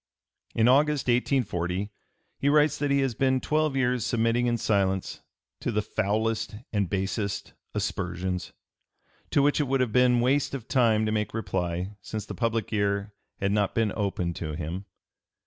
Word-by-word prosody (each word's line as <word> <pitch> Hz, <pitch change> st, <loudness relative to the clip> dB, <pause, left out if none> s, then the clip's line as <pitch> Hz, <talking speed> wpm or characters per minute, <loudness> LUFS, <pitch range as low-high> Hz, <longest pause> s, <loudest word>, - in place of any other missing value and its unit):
In 115 Hz, +1 st, +4 dB
August, 145 Hz, +2 st, +4 dB
1840, 105 Hz, -7 st, 0 dB, 0.5 s
he 140 Hz, -, +2 dB
writes 150 Hz, 0 st, +4 dB
that 145 Hz, 0 st, 0 dB
he 140 Hz, 0 st, +3 dB
has 135 Hz, -3 st, 0 dB
been 130 Hz, +2 st, +2 dB
twelve 155 Hz, +1 st, +1 dB
years 125 Hz, -3 st, +1 dB
submitting 115 Hz, +1 st, +1 dB
in 120 Hz, -1 st, +1 dB
silence 95 Hz, -4 st, 0 dB, 0.4 s
to -, -, -2 dB
the 105 Hz, -1 st, 0 dB
"foulest 110 Hz, +1 st, -1 dB, 0.2 s
and 100 Hz, -4 st, +1 dB
basest 100 Hz, +1 st, -2 dB, 0.2 s
aspersions," 90 Hz, 0 st, -2 dB, 0.8 s
to 140 Hz, -, +3 dB
which 145 Hz, +2 st, +3 dB
it 150 Hz, -, +2 dB
would 135 Hz, +1 st, +1 dB
have 125 Hz, -4 st, 0 dB
been 125 Hz, -1 st, +5 dB
waste 135 Hz, +3 st, +2 dB
of 125 Hz, -4 st, -7 dB
time 115 Hz, -5 st, +3 dB
to 110 Hz, -, 0 dB
make 105 Hz, 0 st, -1 dB
reply, 90 Hz, -2 st, -2 dB
since 105 Hz, +1 st, -5 dB
the 105 Hz, -, -6 dB
public 115 Hz, +3 st, -1 dB
ear 100 Hz, 0 st, 0 dB, 0.3 s
had 100 Hz, 0 st, 0 dB
not 100 Hz, -1 st, +1 dB
been 110 Hz, -3 st, +1 dB
open 95 Hz, -4 st, -1 dB
to 80 Hz, -2 st, -5 dB
him. 85 Hz, +4 st, -5 dB
110 Hz, 165 wpm, -27 LUFS, 100-125 Hz, 0.8 s, been